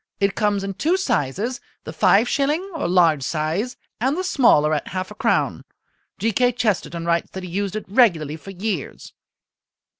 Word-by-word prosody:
It 200 0 +1
comes 205 -2 0
in 195 0 -3
two 320 - +1
sizes, 220 - -1 0.2
the - - -7
five 220 +5 +4
shilling 300 +7 0
(or 320 - -2
large 170 -5 +3
size) 160 - -2 0.2
and 265 +7 0
the 370 - -1
smaller 230 - +4
at 150 - -2
half 185 +1 -4
a - - -6
crown. - - 0 0.5
G. 225 - 0
K. 245 +4 +2
Chesterton 200 -7 -1
writes 170 0 0
that 190 - -6
he 180 - -7
used 200 +2 -2
it 215 - -4
regularly 175 - +3
for 180 - -12
years." 195 -4 -5
200 Hz, 175 wpm, -22 LUFS, 170-245 Hz, 0.5 s, five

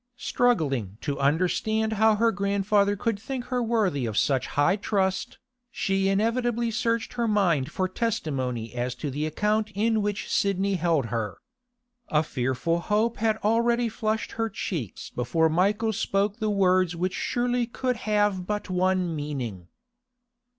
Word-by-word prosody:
Struggling 140 - 0
to 145 -2 -3
understand 185 +9 +1
how 220 0 +4
her 230 +2 +3
grandfather 200 +1 +1
could 220 0 -1
think 255 +2 -5
her 250 - +1
worthy 210 - +1
of 105 -2 -4
such 135 -2 +2
high 145 +7 +4
trust, 195 -2 -1 0.3
she 195 -4 0
inevitably 230 +3 +1
searched 230 0 -1
her 235 -1 0
mind 180 -11 +2
for 185 -1 0
testimony 130 - -2
as 125 +1 -2
to 140 +2 -4
the 150 +3 -2
account 210 +6 0
in 220 +1 +2
which 205 0 -2
Sidney 200 0 +1
held 165 -6 +1
her. 110 -3 -2 0.7
A 150 0 +3
fearful 130 +5 -1
hope 215 +6 0
had 220 0 +1
already 235 +2 +2
flushed 220 0 -2
her 225 0 -2
cheeks 160 - -5
before 160 +7 +1
Michael 205 +7 +1
spoke 200 +1 0
the 215 -2 -1
words 185 -3 +2
which 180 +2 -1
surely 245 +1 0
could 250 +1 -2
have 205 -4 0
but 210 -2 -3
one 185 -2 +1
meaning. 130 - -5
200 Hz, 145 wpm, -26 LUFS, 155-220 Hz, 0.7 s, how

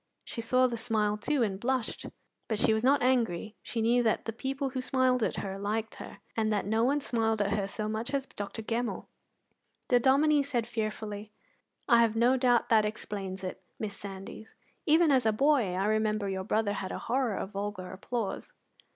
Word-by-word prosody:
She 230 - -5
saw 255 +3 +3
the 240 -2 -1
smile, 215 -2 +1
too, 260 +5 0
and 195 -3 -2
blushed; 255 +1 -2 0.4
but 220 - -1
she 220 - +3
was 220 +1 0
not 275 +1 +4
angry: 225 -5 +1
she 225 -2 -3
knew 240 +2 +4
that 225 -2 +1
the 225 - -3
people 270 +3 -3
who 255 0 -2
smiled 255 -1 +2
at - - 0
her 195 -1 -4
liked 220 +2 -2
her, - - -9 0.2
and 220 -1 +1
that 205 -3 0
no 220 +3 +1
one 280 +4 +2
smiled 225 -3 0 0.3
so 210 +1 -4
much 220 +3 -3
at - - -8
her - - +5
as 270 - -5
Dr. 205 -1 -6
Gemmell. 235 +2 -2 0.8
The 245 - +5
Dominie 285 +4 +4
said 255 -5 -1
fearfully: 215 -2 -4 0.6
"I 235 -3 +6
have 225 -1 +2
no 240 +3 +4
doubt 245 -2 +3
that 220 -2 +5
explains 200 -3 -4
it, 185 0 -5 0.2
Miss 205 -2 -4
Sandys. 195 +2 -9 0.3
Even 320 0 +5
as 255 -4 +3
a - - +5
boy 245 -5 +2
I 190 +2 0
remember 215 -1 +1
your 190 -1 -3
brother 215 -1 +1
had 195 -2 -4
a - - -3
horror 245 -3 +1
of 190 - -4
vulgar 200 -2 -4
applause." 225 - -4
225 Hz, 195 wpm, -30 LUFS, 210-255 Hz, 0.8 s, I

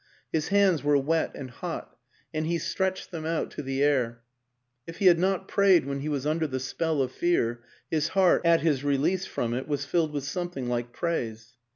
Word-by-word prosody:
His 155 -1 0
hands 195 -6 +3
were 145 0 +4
wet 160 +4 +1
and 130 -2 -7
hot, - - -6 0.4
and 155 0 -1
he 170 +1 +1
stretched 190 +2 -2
them 165 -3 -5
out 165 0 -2
to - - -6
the 135 0 -1
air; 120 -5 +1 0.6
if 165 - -8
he 200 - -1
had 175 -2 +7
not 190 +1 0
prayed 195 -6 +4
when 140 0 -3
he 145 +2 -3
was 145 -2 -2
under 160 +1 +1
the 130 -2 -3
spell 150 +2 -1
of 130 - -4
fear, 120 -8 0 0.3
his 155 -1 +1
heart, 185 -2 +5
at 170 -1 +4
his 145 -5 +1
release 145 +7 +1
from 120 -1 -2
it, 130 +2 -3
was 145 -2 -2
filled 165 -2 +1
with 145 -2 -3
something 175 -3 -4
like 120 0 -2
praise. 115 -7 -3
150 Hz, 205 wpm, -27 LUFS, 135-170 Hz, 0.6 s, had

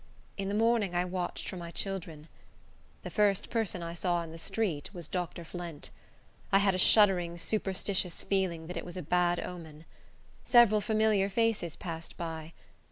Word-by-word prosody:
In 195 -1 -3
the 200 - -1
morning 225 -4 +2
I 175 +1 +2
watched 180 -1 -4
for 185 - -5
my 170 -1 -6
children. 170 -5 -4 0.8
The - - -6
first 205 -3 +2
person 215 -6 -1
I 170 0 -5
saw 175 0 0
in 165 - -9
the 165 - -9
street 170 -6 -2
was 170 -3 -5
Dr. 175 -1 -4
Flint. 170 -2 -7 0.6
I 195 - +6
had 195 -1 +3
a 185 - -1
shuddering, 180 -4 +5
superstitious 190 -1 0
feeling 185 -5 0
that 180 +1 -6
it - - -4
was 175 +1 -8
a 180 - -4
bad 175 +2 +2
omen. 160 -3 -8 0.6
Several 230 -4 +6
familiar 215 -2 +2
faces 215 -6 0
passed 165 -2 -7
by. 165 -1 -6
180 Hz, 165 wpm, -30 LUFS, 170-200 Hz, 0.8 s, I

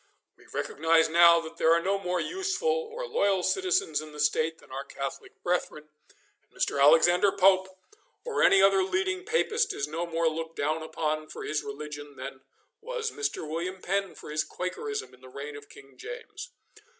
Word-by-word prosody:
We - - -21
recognise 160 +1 +2
now 170 +1 +7
that 165 0 -10
there 160 - +4
are 170 - +4
no 195 +3 0
more 180 -2 -1
useful 385 - -1 0.2
or - - -5
loyal 200 - +1
citizens 380 - +1
in 155 -1 -11
the 150 - -10
state 155 +2 +1
than - - -19
our 135 +1 -4
Catholic 135 -1 -7
brethren, 165 -4 -2 0.5
and - - -41
Mr. 140 - -1
Alexander 175 +6 +6
Pope 190 -1 +4 0.6
or 475 - -1
any 195 0 +6
other 195 -1 +5
leading 370 - -1
Papist 450 0 +1
is 140 - -2
no 165 +3 -3
more 165 0 0
looked 160 +1 -3
down 155 +2 -1
upon 155 -1 -2
for - - -8
his 150 0 -1
religion 150 -7 -7
than 130 0 -8 0.4
was 460 0 -3
Mr. 425 - -3
William 175 +4 -4
Penn 195 +1 -2
for - - -10
his 155 0 0
Quakerism 420 - -5
in 125 - -19
the 130 - -13
reign 140 +3 -7
of 145 0 -11
King 135 -1 -15
James. - - -8
170 Hz, 180 wpm, -28 LUFS, 150-200 Hz, 0.6 s, now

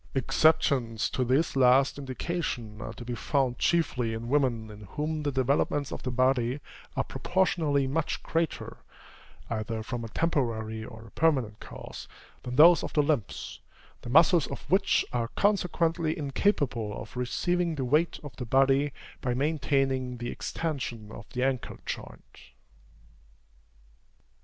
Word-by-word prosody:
Exceptions 130 -4 +2
to 130 - 0
this 135 +6 +1
last 135 +2 +4
indication 130 -6 -4
are - - -5
to 120 - -10
be 125 - -3
found 130 0 0
chiefly 130 -9 +1
in 115 +1 -5
women 125 -6 +1
in 105 0 -11
whom 155 +1 -2
the 145 -1 -1
developments 140 +2 +1
of - - -5
the 130 - -3
body 130 +1 +1 0.4
are - - +2
proportionally 160 -7 +1
much 145 +4 -2
greater, 165 -1 -2 0.7
either 110 0 -2
from 120 +1 -4
a - - -5
temporary 110 -7 -1
or 110 0 -10
a 115 - -14
permanent 130 -10 +1
cause, - - -9 0.3
than 125 0 -5
those 165 +5 +7
of - - -5
the 150 - +3
limbs, 140 - -2 0.4
the - - -8
muscles 160 +3 +5
of - - -6
which 190 +2 +3
are 120 -2 0
consequently 170 -5 +1
incapable 135 - 0
of 110 - -10
receiving 170 +7 0
the 135 -3 -2
weight 150 +7 +2
of 145 - -9
the 125 - -4
body 135 +3 +3 0.3
by 125 -1 -1
maintaining 135 -3 0
the 120 0 -4
extension 125 -9 -4
of 105 -4 -10
the 125 - -1
ankle 130 -2 -1
joint. - - -8
135 Hz, 140 wpm, -28 LUFS, 120-155 Hz, 0.7 s, those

